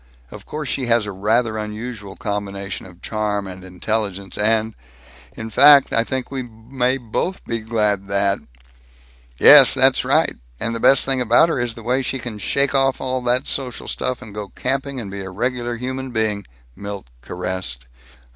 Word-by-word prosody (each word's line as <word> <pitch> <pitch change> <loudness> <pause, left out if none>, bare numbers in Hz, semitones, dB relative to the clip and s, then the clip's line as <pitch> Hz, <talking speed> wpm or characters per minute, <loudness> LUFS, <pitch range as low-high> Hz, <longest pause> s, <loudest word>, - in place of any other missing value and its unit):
Of - - -11
course 150 -1 -5
she 130 -2 -2
has 115 -2 +3
a 105 - -5
rather 110 +3 0
unusual 105 -1 -6
combination 100 -2 -4
of 90 -1 -17
charm 105 -2 -2
and 95 -1 -9
intelligence 100 +1 -3
and 110 +1 +1 0.6
In 110 0 -7
fact 140 +2 +7
I 115 - +3
think 130 +2 -4
we 135 -1 -3
may 125 +2 -2
both 135 - -3
be 115 -1 -2
glad 105 -3 -1
that 100 0 +1 0.5
" - - -29
"Yes. - - +9
That's - - +4
right. - - +2 0.2
And 115 - -2
the 115 - -3
best 135 +3 +5
thing 135 -1 +1
about 120 +7 +4
her 150 - -1
is 120 -2 -2
the 115 - -10
way 125 +3 +1
she 135 +1 -2
can 115 -4 -7
shake 140 +8 0
off 135 -1 +2
all 130 0 -2
the 125 +1 +1
social 130 -3 -3
stuff 130 - -3
and 105 - -11
go 105 -1 -6
camping 135 +1 -3
and 100 -5 -7
be 100 - -6
a 95 - -6
regular 120 +4 -2
human 130 +2 -4
being," 110 -3 -2 0.3
Milt 100 -5 -7 0.2
caressed. 90 -6 -5
110 Hz, 180 wpm, -20 LUFS, 100-125 Hz, 0.6 s, Yes